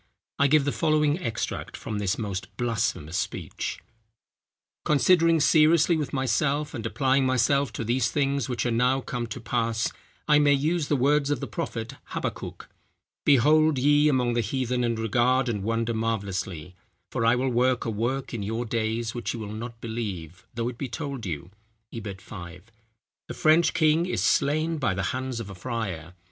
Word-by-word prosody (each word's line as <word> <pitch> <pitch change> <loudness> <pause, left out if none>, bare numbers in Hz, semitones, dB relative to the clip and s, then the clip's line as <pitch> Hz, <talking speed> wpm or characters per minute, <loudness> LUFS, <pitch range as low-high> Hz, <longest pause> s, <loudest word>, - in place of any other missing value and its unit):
I 140 - +5
give 145 0 +4
the 145 - +1
following 155 0 +2
extract 115 -11 -4
from 105 -1 -4
this 100 -3 0
most 100 -4 -4
blasphemous 110 -9 -1
speech:— - - -4 1.0
"Considering 165 +2 +4
seriously 155 +3 +5
with 150 -4 -2
myself, 140 +3 0
and 115 - -5
applying 135 +2 +2
myself 130 +1 +2
to 115 - -3
these 120 +1 +1
things 140 -3 0
which 125 -1 -2
are 120 - +1
now 125 +3 +2
come 120 -2 -4
to 115 +3 -6
pass, 115 -1 -1 0.4
I 150 -1 +6
may 145 -1 +5
use 150 +3 0
the 145 - +2
words 140 +2 +2
of 145 - 0
the - - -4
prophet 140 -6 -5 0.2
Habbakuk: - - -5 0.6
'Behold, 150 +3 +5
ye 145 +3 +4
among 125 -4 +1
the 120 - +1
heathen, 125 +2 -1
and 115 -1 0
regard, 120 +4 +2
and 105 -4 -1
wonder 115 +2 -1
marvellously; 100 -6 -3 0.4
for 125 - -1
I 115 +1 +4
will 130 +1 0
work 125 +1 +2
a 115 - -1
work 120 +6 -2
in 115 - -3
your 115 +4 -2
days, 115 0 -1
which 120 0 -3
ye - - -6
will 105 -1 -6
not 115 +1 -7
believe, 95 -7 -5
though 115 0 -1
it 120 -1 -6
be 135 - -3
told 135 -3 -5
you;' 85 +2 -5 0.4
i. 115 - -4
5. 95 -1 -9 0.6
The - - -5
French 160 +2 +4
king 160 +1 +3
is - - -1
slain 155 +3 +1
by 130 -9 0
the 95 - -2
hands 130 -2 -3
of 105 -4 -6
a - - -7
friar. 90 -5 -5
125 Hz, 175 wpm, -26 LUFS, 110-145 Hz, 1.0 s, I